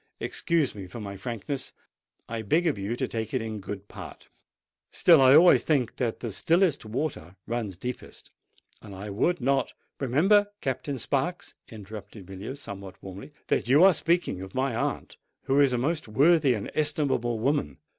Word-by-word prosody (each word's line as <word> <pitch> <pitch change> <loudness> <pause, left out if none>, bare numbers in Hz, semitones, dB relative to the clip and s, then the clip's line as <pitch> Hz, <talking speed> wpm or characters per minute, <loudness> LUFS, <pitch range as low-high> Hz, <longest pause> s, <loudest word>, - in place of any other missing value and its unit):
Excuse 165 -6 0
me 100 -3 -8
for 105 +6 -9
my 100 -2 -6
frankness—I 115 +1 -7
beg 160 - +1
of 150 -11 0
you 100 +4 -2
to - - -2
take 110 +1 -4
it 130 - +1
in 110 -1 -5
good 100 0 -7
part: - - -11 0.6
still 165 -5 +5
I 130 +1 +7
always 175 +3 +7
think 135 -7 0
that 120 -3 -2
the 115 - -3
stillest 165 - +2
water 110 - -4
runs 110 -6 -3
deepest; 125 +5 -7 0.5
and 100 -3 -10
I 100 +2 -7
would 170 - +1
not——" 135 +2 0 0.3
"Remember, 190 - +3
Captain 135 -1 -3
Sparks," 140 +8 -2 0.2
interrupted 105 -2 -10
Villiers, 100 +9 -7
somewhat 100 -6 -8
warmly, 95 +8 -9
"that - - 0
you 140 +7 +6
are 195 0 +8
speaking 170 - 0
of 95 0 -9
my 130 -2 0
aunt, - - -3 0.3
who 135 +1 +2
is 140 -2 +5
a 125 - 0
most 155 +5 -1
worthy 140 +3 +4
and 105 - -5
estimable 140 -6 0
woman. 115 - -1
125 Hz, 165 wpm, -27 LUFS, 105-145 Hz, 0.6 s, are